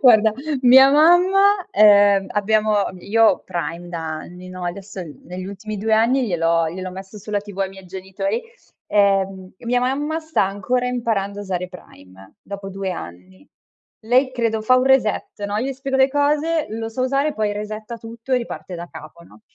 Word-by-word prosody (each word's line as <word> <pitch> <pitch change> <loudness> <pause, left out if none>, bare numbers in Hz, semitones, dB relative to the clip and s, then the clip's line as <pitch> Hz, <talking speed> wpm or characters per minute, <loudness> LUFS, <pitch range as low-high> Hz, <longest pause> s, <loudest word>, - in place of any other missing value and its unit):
Guarda 220 -4 +6 0.3
mia 265 +2 +8
mamma 370 +6 +4
ehm 205 - +5
abbiamo 215 +1 +1 0.2
io 225 +4 +2
ho 190 - +3
Prime 170 +1 -5
da 170 -1 -5 0.2
anni, 180 +1 -11
no, 185 -1 -7
adesso 190 +1 -6 0.2
negli 180 +1 -7
ultimi 205 +2 -7
2 220 +2 -2
anni 240 +3 +2
gliel'ho 165 -3 +1
gliel'ho 185 +1 -6
messo 195 +2 -10
sulla 205 0 -3
TV 205 -1 -11
ai 195 -1 0
miei 190 -1 -13
genitori, 195 +4 -4 0.5
ehm 195 -2 +1
e - - -16
mia 245 +1 +2
mamma 290 +6 -1
sta 315 -7 0
ancora 205 +6 -1
imparando 220 -5 -2
a - - -5
usare 180 -2 -3
Prime 95 - -15
dopo 200 -1 -7
2 195 0 -4
anni. 95 - -11 0.6
Lei 255 +3 +3
credo 230 -3 -1
fa 255 +3 +4
un 255 - +2
reset, 250 -5 +1
no, 205 +1 -3
io 255 +5 -1
gli - - -3
spiego 270 0 -3
le 265 0 +5
cose, 300 +3 +1
lo 225 +1 -5
sa 240 - -5
usare 275 +3 +1
poi 215 -1 -1
resetta 215 +2 -6
tutto 230 +3 -8
e - - +5
riparte 235 -6 -6
da 170 - -7
capo, 155 +3 -12
no? - - -19
210 Hz, 180 wpm, -21 LUFS, 190-250 Hz, 0.6 s, mia